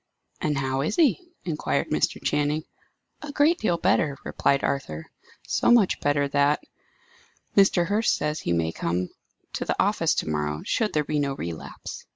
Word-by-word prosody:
"And 150 -2 0
how 135 0 -1
is 155 +9 -1
he?" 340 +3 +2 0.2
inquired 160 -4 -1
Mr. - - +1
Channing. 150 +1 0 0.6
"A 300 - -6
great 300 +4 +3
deal 175 -6 +1
better," 170 -6 +1
replied 140 0 +1
Arthur. 80 - -3 0.3
"So - - +1
much 235 -6 +4
better 145 0 +1
that 145 +1 +2 0.9
Mr. 195 -3 +5
Hurst 210 +4 +2
says 150 +1 -2
he - - -3
may 85 -1 +1
come 90 +2 -2 0.4
to - - -2
the - - -2
office - - +2
to - - -1
morrow 75 0 -2
should 220 -2 0
there 150 - +2
be 150 0 -1
no 140 -1 -1
relapse. 85 - -7
150 Hz, 165 wpm, -25 LUFS, 135-195 Hz, 0.9 s, Mr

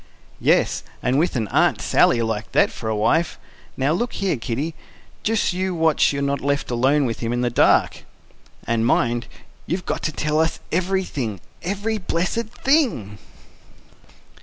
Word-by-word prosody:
"Yes, - - +2 0.2
and 130 +3 +2
with 170 0 +1
an 110 -4 -1
Aunt - - +2
Sally 115 -1 +3
like 110 -1 -3
that - - +4
for 110 - -5
a 110 - 0
wife. 160 +10 +1 0.4
Now 135 +2 +1
look 235 +9 -1
here, 195 -5 0
Kiddy, 130 +7 -3 0.5
just 220 -3 +1
you 185 0 -1
watch 160 -1 +3
you're 140 0 -2
not 140 0 -1
left 140 -1 -1
alone 135 +4 +2
with 115 -3 -3
him 115 -1 -2
in 120 0 0
the 120 -1 0
dark." - - +3 0.6
"And 115 -1 0
mind, 120 0 +1 0.4
you've 180 +2 -2
got - - -2
to 155 - -1
tell 150 0 -1
us 160 0 +1
everything 180 - -1 0.2
every 205 +4 -2
blessed 180 +5 -1
thing!" 230 - 0
145 Hz, 160 wpm, -22 LUFS, 120-185 Hz, 0.6 s, that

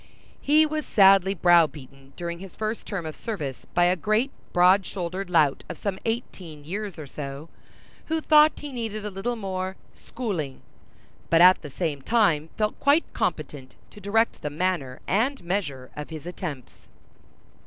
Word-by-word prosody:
He 305 +2 +5
was 310 0 -2
sadly 195 -1 +5
brow 175 -2 +5
beaten 135 -2 -15
during 170 -1 -5
his 190 -1 -11
first 220 +1 -4
term 195 -6 -4
of 155 - -6
service 150 - -5
by 175 - +4
a 175 +1 +4
great 215 - 0 0.2
broad 180 +3 +5
shouldered 185 +1 -5
lout 155 -6 +3
of 170 - -6
some 195 -2 -3
eighteen 185 -9 -5
years 200 +4 -5
or 155 - -7
so, 140 +2 -7 0.6
who 320 0 0
thought 305 0 +5
he 295 -1 -6
needed 220 -4 -4
a 210 - -4
little 205 +6 -3
more 190 -3 -4 0.2
"schooling," 180 - -5 0.7
but 165 - +4
at 180 +2 +7
the 150 - -8
same 145 -1 -3
time 165 - +2
felt 215 -1 -1
quite 285 +4 +3
competent 130 -3 -3 0.2
to 210 - -14
direct 225 +4 +1
the 150 - -3
manner 150 -5 -2
and 245 +7 0
measure 160 -9 -3
of 150 0 -7
his 160 -1 -8
attempts. 165 -7 -7
185 Hz, 165 wpm, -25 LUFS, 155-215 Hz, 0.7 s, at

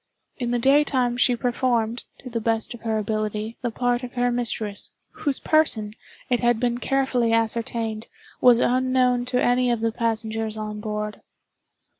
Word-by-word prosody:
In 245 -2 -3
the 245 - +1
daytime 265 -1 +2
she 245 0 +3
performed, 240 -1 -1 0.2
to 255 - -8
the 230 -1 -2
best 225 +1 0
of 240 - -11
her 220 -1 -1
ability, 215 +1 -3
the 245 - -1
part 245 +1 0
of 250 -1 -8
her 245 0 +1
mistress—whose 240 +4 -3
person, 225 -10 +2 0.3
it 245 -2 +1
had 240 -2 +2
been 240 0 0
carefully 265 -3 +1
ascertained, 225 0 0 0.3
was 245 -2 +6
unknown 255 -1 +2
to 250 0 0
any 250 0 +2
of 235 -2 0
the 230 0 +1
passengers 225 -1 -1
on 215 -1 -5
board. 210 0 -4
235 Hz, 155 wpm, -23 LUFS, 220-250 Hz, 0.3 s, was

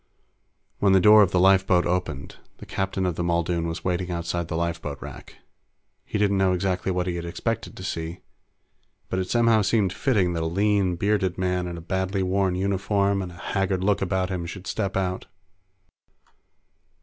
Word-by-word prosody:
When 100 -1 +4
the 95 - +6
door 105 +3 +8
of 100 - +4
the 90 - +1
lifeboat 95 -1 +4
opened, 85 -6 -3 0.2
the - - -11
captain 95 0 -2
of 90 -3 -1
the 85 - -1
Muldoon 85 0 0
was 80 +1 -5
waiting 90 0 -1
outside 85 -1 -2
the 80 - -4
lifeboat 85 -4 -3
rack. - - -10 0.7
He - - -3
didn't 100 -1 +2
know 95 -1 +3
exactly 90 0 -1
what 90 -1 -1
he 90 -1 -2
had 85 - -5
expected 115 +7 -3
to 95 - -8
see, 85 -2 -4 0.9
but 95 - -1
it 95 -1 -3
somehow 115 -2 +4
seemed 100 -2 +1
fitting 100 -10 +1
that 85 - -2
a 80 - -1
lean, 100 +1 +1
bearded 100 -1 0
man 90 -1 -1
in 85 -1 -5
a - - -8
badly 95 +2 -1
worn 95 0 +1
uniform 100 +1 0
and 90 -1 -6
a - - -13
haggard 95 0 -1
look 100 0 +2
about 95 0 -1
him 85 -2 -3
should 95 +2 -8
step 100 -3 -2
out. 95 -1 -2
95 Hz, 185 wpm, -25 LUFS, 85-100 Hz, 0.9 s, door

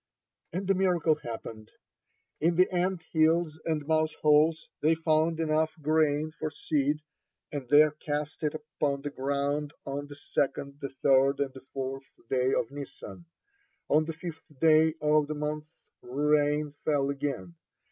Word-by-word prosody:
And 185 +3 -3
a 195 - +4
miracle 180 -4 +2
happened. 115 -5 -7 0.7
In 165 +2 +2
the 185 +2 +5
ant 180 -1 0
hills 160 0 +2
and 155 -3 -1
mouse 155 0 +1
holes, 155 +2 +3
they 160 +2 +4
found 160 0 +1
enough 155 0 +1
grain 155 0 +2
for 155 - -1
seed, 150 0 -1 0.5
and 140 -4 -5
they 150 +1 +7
cast 150 0 -3
it 150 -1 -1
upon 150 -2 -2
the 145 - -3
ground 140 +2 -1
on 140 +1 -4
the 145 - -10
second, 140 0 -2
the 140 - -3
third, 135 +1 +3
and 140 -2 -1
the 130 - -11
fourth 135 0 -5 0.2
day 130 0 +2
of 115 - 0
Nisan. 145 +4 -9 0.6
On 155 +2 +4
the 165 - -4
fifth 165 0 -8
day 160 0 +5
of 150 -1 +3
the 155 - -3
month 150 +1 -3 0.3
rain 150 +2 +1
fell 140 -2 +1
again. 135 -11 -4
150 Hz, 150 wpm, -29 LUFS, 140-155 Hz, 0.7 s, they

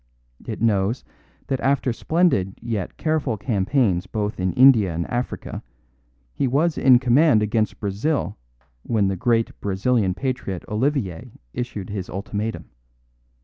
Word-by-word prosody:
It - - -4
knows 105 +2 +1 0.4
that 135 -2 -2
after 135 -2 +1
splendid 135 - +1
yet 110 -6 -4
careful 155 -8 0
campaigns 100 -2 +1
both 105 0 -3
in 90 0 0
India 125 -8 +6
and 85 +1 -2
Africa 120 +1 -4 0.7
he 135 - 0
was 150 +6 +1
in 130 -2 +6
command 125 -1 +4
against 110 0 0
Brazil 105 +10 -1 0.5
when 105 - +1
the 95 - -1
great 115 +4 +1
Brazilian 100 0 +1
patriot 125 -9 -3
Olivier 105 - -1 0.2
issued 105 -6 -5
his 95 -3 -5
ultimatum. 105 +3 -4
110 Hz, 125 wpm, -23 LUFS, 95-130 Hz, 0.7 s, India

